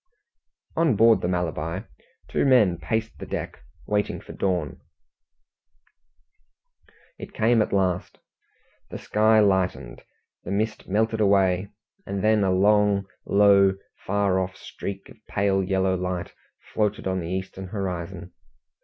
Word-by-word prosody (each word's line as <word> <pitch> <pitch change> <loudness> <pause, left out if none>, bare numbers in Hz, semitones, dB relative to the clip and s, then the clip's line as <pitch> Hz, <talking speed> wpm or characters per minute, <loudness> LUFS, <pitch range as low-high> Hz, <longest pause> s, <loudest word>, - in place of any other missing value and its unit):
On 160 -7 +2
board 115 +2 +5
the - - -1
Malabar 90 +2 -3 0.4
two - - 0
men 110 - +4
paced 110 +8 -3
the - - -7
deck, - - -5 0.3
waiting 105 0 -1
for - - -11
dawn. 90 -7 -2 2.4
It - - -10
came 115 +1 +3
at - - -1
last. 95 -2 -1 0.7
The - - -6
sky 110 +1 +3
lightened, 90 -11 0 0.4
the - - -8
mist 110 +2 -2
melted 110 +2 +1
away, 95 -2 +2 0.3
and 100 -1 -4
then 110 -1 +3
a 95 - +2
long, 100 +1 +3 0.2
low, 100 -1 +5 0.3
far 100 -1 +1
off 95 0 -3
streak 100 0 -7
of - - -16
pale 100 -1 +1
yellow 95 0 +1
light 90 -1 -4 0.4
floated 105 +1 -1
on 95 0 -1
the 85 -1 -5
eastern 95 0 -5
horizon. 90 -2 -5
95 Hz, 125 wpm, -24 LUFS, 95-105 Hz, 2.4 s, board